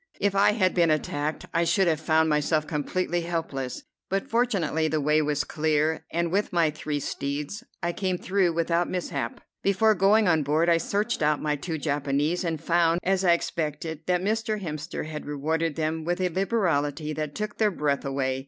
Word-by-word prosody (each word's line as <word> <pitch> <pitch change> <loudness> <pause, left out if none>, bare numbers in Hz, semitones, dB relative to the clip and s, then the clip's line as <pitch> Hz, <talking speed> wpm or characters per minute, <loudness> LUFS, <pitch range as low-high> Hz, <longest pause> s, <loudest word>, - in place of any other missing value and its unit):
If 205 -1 +1
I 200 +1 +4
had 190 -4 +2
been 170 -2 +3
attacked, 155 0 -1
I 170 - +2
should 190 +2 +2
have 160 -3 +2
found 160 0 +2
myself 155 0 +1
completely 175 +3 -1
helpless; 160 -7 -3 0.3
but 195 +1 -1
fortunately 195 -10 +1
the 155 0 0
way 150 +2 +3
was 150 -1 0
clear, 155 0 0
and 170 0 0
with 200 +3 0
my 170 -3 +2
three 150 -1 -3
steeds 145 - -4 0.2
I 175 0 0
came 185 -1 -1
through 185 -2 +1
without 170 +1 +1
mishap. 140 -9 -3 0.2
Before 200 +3 +3
going 205 +2 +4
on 160 -3 +3
board 155 +4 +2
I 170 - +5
searched 210 +6 -1
out 150 -1 +2
my 150 -1 0
two 160 +3 -4
Japanese, 145 +3 0
and 165 -3 -2
found, 170 +1 +2
as 190 0 +1
I 175 -2 +5
expected, 160 -2 -3
that 180 -1 +2
Mr. 220 +1 0
Hemster 155 -4 -5
had 155 -1 -7
rewarded 155 +2 -1
them 160 0 -1
with 175 +3 -1
a 185 -1 +1
liberality 160 -6 0
that 150 -1 -4
took 210 -1 -4
their 215 -1 +4
breath 145 -7 -1
away. 135 -1 -1
165 Hz, 185 wpm, -26 LUFS, 150-185 Hz, 0.3 s, I